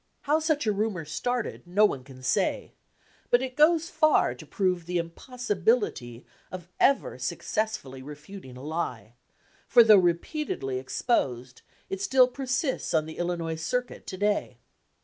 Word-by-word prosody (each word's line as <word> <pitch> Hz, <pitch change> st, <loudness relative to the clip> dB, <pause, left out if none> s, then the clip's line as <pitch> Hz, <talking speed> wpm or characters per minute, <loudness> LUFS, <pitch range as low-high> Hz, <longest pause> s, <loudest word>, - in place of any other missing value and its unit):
How 300 Hz, +2 st, +2 dB
such 310 Hz, -3 st, 0 dB
a 215 Hz, -, +2 dB
rumor 200 Hz, -5 st, -2 dB
started 245 Hz, +10 st, -3 dB
no 200 Hz, +4 st, +4 dB
one 135 Hz, -10 st, -1 dB
can 130 Hz, -1 st, -14 dB
say, 130 Hz, -, 0 dB, 0.6 s
but 245 Hz, +1 st, +4 dB
it 255 Hz, -1 st, -5 dB
goes 320 Hz, +2 st, +4 dB
far 310 Hz, -1 st, +3 dB
to -, -, -12 dB
prove 180 Hz, -4 st, -1 dB
the 180 Hz, 0 st, -1 dB
impossibility 185 Hz, -, -1 dB, 0.3 s
of 180 Hz, -2 st, -8 dB
ever 275 Hz, -, +2 dB
successfully 210 Hz, -12 st, -3 dB
refuting 150 Hz, 0 st, -10 dB
a 130 Hz, -, -10 dB
lie; 145 Hz, -8 st, -4 dB, 0.5 s
for 240 Hz, -1 st, +7 dB
though 215 Hz, -2 st, +8 dB
repeatedly 170 Hz, -, -1 dB
exposed, 130 Hz, -, -1 dB, 0.3 s
it 195 Hz, 0 st, -5 dB
still 255 Hz, +4 st, +5 dB
per 265 Hz, +1 st, -7 dB
sists 260 Hz, -, -1 dB
on 155 Hz, -, 0 dB
the 160 Hz, -, -9 dB
Illinois 170 Hz, -2 st, -2 dB
circuit 250 Hz, +9 st, -3 dB
to 185 Hz, -, -5 dB
day. 205 Hz, +1 st, 0 dB
190 Hz, 150 wpm, -27 LUFS, 155-250 Hz, 0.6 s, though